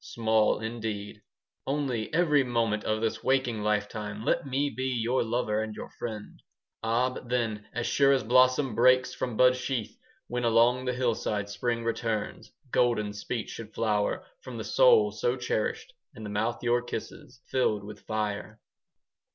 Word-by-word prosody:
Small, 110 -2 +2
indeed. 110 -3 -5 0.5
Only, 135 -6 -1
every 150 -4 +3
moment 115 -4 0
5 - - 0
Of 110 - -3
this 110 - -1
waking 130 -4 +1
lifetime 105 0 -2
Let - - +1
me 140 +2 0
be 130 +1 -3
your 125 0 +1
lover 110 -2 0
And 110 -1 -5
your - - -8
friend! 110 -3 -7 0.4
Ah, 115 +3 +1
but 125 - -9
then, 110 -4 -1
as 120 -1 -3
sure 140 -1 +4
as 135 -2 +2
Blossom 130 +2 +4
breaks 130 +3 +4
from 120 -4 -4
bud 125 0 +6
sheath, 125 -3 -3
10 - - -29 0.3
When 125 0 -3
along 120 +2 +3
the 125 - 0
hillside 110 -5 -1
Spring 115 +2 -2
returns, 115 -1 -3 0.2
Golden 115 -4 +2
speech 110 +3 -4
should 110 -2 -9
flower 105 -2 0 0.2
From - - -8
the - - -4
soul 485 -2 +5
so 480 - -1
cherished, - - -2 0.2
And 110 - -8
the 105 - -5
mouth 110 +4 -1
your 120 0 +2
kisses 120 +1 -7
15 - - -35
Filled 110 -6 +1
with 105 +1 -9
fire. 110 0 -3
115 Hz, 170 wpm, -28 LUFS, 110-130 Hz, 0.5 s, bud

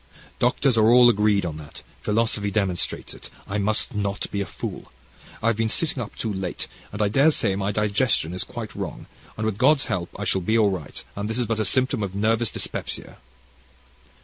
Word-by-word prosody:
Doctors 125 0 +3
are 110 +1 +5
all 120 0 +8
agreed 105 -3 +2
on 80 -3 -4
that, 75 -1 -10 0.2
philosophy 105 -1 +1
demonstrates 95 -3 -1
it. - - -10 0.2
I 100 +1 -2
must 110 +5 +1
not 100 -1 -2
be 100 - -1
a 100 - -3
fool. - - -7 0.5
I've 115 -1 +2
been 115 0 +1
sitting 145 0 -1
up 110 - -7
too 110 -2 -3
late, 95 -2 -3 0.2
and 105 - -6
I - - +3
daresay 115 -3 +3
my 100 +1 -1
digestion 105 -4 +1
is 90 - -2
quite - - -7
wrong, - - -6 0.3
and, 110 - -2
with 105 -2 -2
God's 150 -3 +4
help, 90 -1 -2
I - - -2
shall 95 -1 +1
be 110 +6 +2
all 105 -3 +4
right, 85 -7 -5
and 100 +1 -3
this 110 - -1
is 125 - +1
but 115 -1 -1
a 110 - +1
symptom 130 +3 +2
of 100 -2 -3
nervous 110 +2 +2
dyspepsia.' - - -5
105 Hz, 200 wpm, -24 LUFS, 100-115 Hz, 0.5 s, all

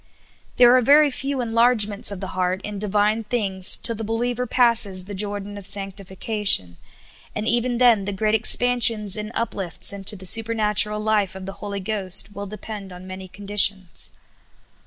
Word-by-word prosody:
There 245 0 +5
are 255 - +3
ver} 290 +4 +4
few 270 0 -3
enlargements 230 -3 +2
of 200 -2 -4
the 190 - -5
heart 185 0 -2
in 205 -1 -6
Divine 210 +2 -1
things 200 -4 +3
till 230 - -3
the 225 0 -7
believer 240 +3 -3
passes 225 -7 +2
the 205 - -9
Jordan 205 0 -3
of 200 - -12
sanctification; 195 - -1 0.6
and 210 +1 -4
even 240 +1 0
then 235 -5 +3
the 205 - -4
great 215 +2 -2
expansions 225 -2 +3
and 215 0 -4
uplifts 195 -6 -2
into 200 +1 -6
the 190 -1 -11
supernatural 210 0 +2
life 210 -3 -1
of 190 0 -9
the 195 - -7
Holy 200 -1 -6
Ghost 200 -1 -1
will 200 +1 -7
depend 210 -1 -9
on 180 +1 -12
manj^ 185 0 -10
conditions. 195 - +1
210 Hz, 160 wpm, -21 LUFS, 195-225 Hz, 0.6 s, There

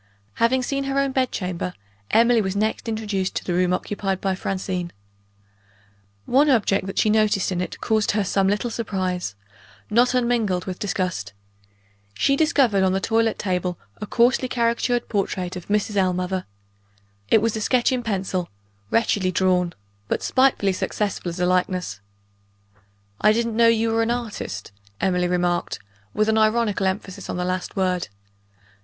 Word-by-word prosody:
Having 255 +2 +3
seen 275 +2 -2
her 275 0 -1
own 275 -1 +2
bed 260 -1 0
chamber, 180 -1 -3 0.3
Emily 230 0 +4
was 190 -1 -2
next 215 +2 -1
introduced 210 -4 -2
to - - -2
the 180 - -2
room 180 0 +2
occupied 195 +1 -2
by 195 -1 0
Francine. 185 -2 -3 1.3
One 285 +4 +4
object 205 -6 +2
that 195 - -6
she 215 - +3
noticed 215 -3 +2
in 180 -1 -1
it 180 - -5
caused 220 -1 +1
her 210 - +2
some 195 0 +1
little 210 +4 0
surprise 185 - -2 0.6
not 245 +3 +4
unmingled 235 -7 +1
with 185 -1 -5
disgust. 180 - -2 0.8
She 275 - +2
discovered 275 - +3
on 190 -1 +3
the 190 - +1
toilet 225 +2 +1
table 180 -2 -2 0.2
a 210 - -6
coarsely 250 +4 +3
caricatured 240 0 0
portrait 190 -3 -2
of 180 - -8
Mrs. 210 0 0
Ellmother. 185 0 0 0.8
It - - +6
was 230 -1 +1
a 220 - -3
sketch 250 +4 +2
in 255 -1 0
pencil 190 -5 -2 0.4
wretchedly 205 - +2
drawn; 180 -1 +2 0.4
but - - -1
spitefully 255 -7 +3
successful 195 -1 -2
as 170 +1 -6
a 180 - +2
likeness. 180 - 0 1.2
"I 215 - +6
didn't 230 0 -1
know 230 0 +5
you 225 0 +3
were 225 0 +2
an 225 - 0
artist," 225 - -4 0.3
Emily 180 -1 +1
remarked, 175 -1 0 0.3
with 215 0 +1
an 220 0 +3
ironical 215 -3 +2
emphasis 190 0 -4
on - - -3
the 180 - -1
last 185 0 -3
word. 185 -2 0
200 Hz, 160 wpm, -23 LUFS, 185-230 Hz, 1.3 s, It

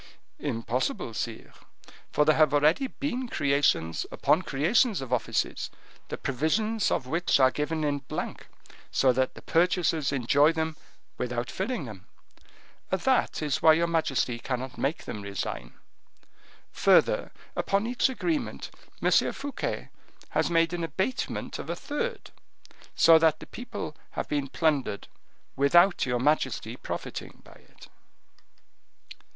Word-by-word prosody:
"Impossible, 115 0 -2
sire, 115 0 -5 0.6
for 150 - +3
there 155 0 +5
have 155 -2 +4
already 155 - +3
been 260 -1 -3
creations 140 - +1
upon 160 - +2
creations 185 - +2
of 130 -2 -4
offices, 125 - -1 0.4
the - - -5
provisions 200 - 0
of - - -1
which 165 +3 +1
are 130 -1 +6
given 155 +2 -2
in 145 -1 0
blank, 135 - -6 0.4
so 130 -1 +3
that 130 +1 0
the - - -12
purchasers 165 -4 +2
enjoy 140 +3 +4
them 160 -1 -2 0.4
without 120 0 -2
filling 190 - -3
them. 105 -6 -10 0.8
That 220 -2 +1
is 150 -3 -1
why 160 - +7
your 165 +2 +2
majesty 135 -8 0
cannot 130 +1 -4
make 140 +4 -2
them 105 - -5
resign. 100 -11 -5 1.0
Further, - - +3 0.2
upon 195 +2 +1
each 245 +3 +1
agreement 300 +4 -2 0.3
M. - - +3 0.2
Fouquet 280 0 -4 0.4
has - - +1
made 165 0 +2
an 175 -1 -2
abatement 190 - -3
of - - -7
a - - -1
third, 470 +12 -4 0.6
so 165 -1 +7
that 160 -1 +3
the - - -9
people 240 -10 -7 0.2
have - - -3
been 145 -2 -1
plundered, 140 -8 0 0.5
without 175 +5 +4
your 125 -1 +1
majesty 150 +5 0
profiting - - -6
by - - -15
it." - - -18
155 Hz, 130 wpm, -27 LUFS, 130-180 Hz, 1.0 s, why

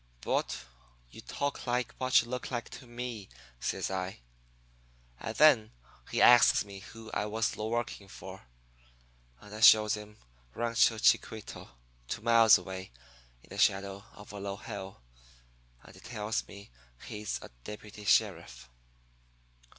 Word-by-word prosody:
"'But - - -2 0.5
you - - -11
talk 140 -2 -4
like 125 -1 -1
what 130 -2 +4
you - - -12
look 125 0 -5
like 120 -3 -4
to 125 0 -11
me,' 120 -4 -6 0.3
says - - -2
I. 95 -6 -4 1.0
"And 110 -1 -5
then 130 -8 +5 0.4
he - - +2
asks 120 -3 +7
me 100 -1 -10
who 110 +3 -12
I 105 - -1
was 110 +1 -1
working 115 -1 -3
for, 95 -5 -11 0.9
and 105 - -13
I 110 - -7
shows 110 -1 +7
him 105 0 -7 0.4
Rancho 115 -1 +2
Chiquito, 110 0 0 0.4
two 100 - -5
miles 115 -1 +7
away, 95 +1 -8 0.5
in - - -21
the - - -8
shadow 100 0 +1
of 105 -2 -12
a 100 - -8
low 100 0 -5
hill, 95 - -8 0.8
and - - -15
he - - -15
tells 110 -1 -3
me 100 -8 -13 0.3
he's 105 -1 -4
a - - -10
deputy 105 +2 -9
sheriff. - - +1
105 Hz, 140 wpm, -30 LUFS, 100-115 Hz, 1.0 s, asks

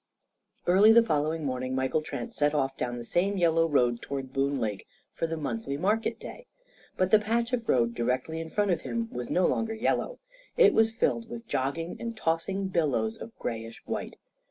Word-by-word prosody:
Early 195 +5 +6
the 230 +1 +7
following 155 -2 0
morning 130 -1 -2
Michael 130 +4 +1
Trent 230 +9 -6
set 150 -4 +1
off 135 -2 0
down 120 -1 -3
the 120 - -6
same 190 +10 0
yellow 165 -2 +3
road 120 -5 +2
toward 135 -2 -5
Boone 140 0 0
Lake 105 -3 -3 0.3
for 165 - -2
the 165 0 -3
monthly 140 -2 -3
market 210 +7 0
day. - - -10 0.5
But 185 0 +1
the 215 - +7
patch 230 +3 -1
of 235 -2 -2
road 120 -2 +3
directly 125 +7 -1
in 165 - -7
front 205 +2 +1
of 175 - 0
him 230 -1 -3
was 125 -1 -5
no 180 - +2
longer 225 -1 0
yellow. 255 - 0 0.4
It 455 -4 +7
was 225 0 +4
filled 230 0 0
with 235 0 -7
jogging 165 - -2
and 230 -1 -5
tossing 190 +2 -1
billows 170 - 0
of 230 - -9
greyish 115 -1 -5
white. - - -4
165 Hz, 190 wpm, -28 LUFS, 135-220 Hz, 0.5 s, the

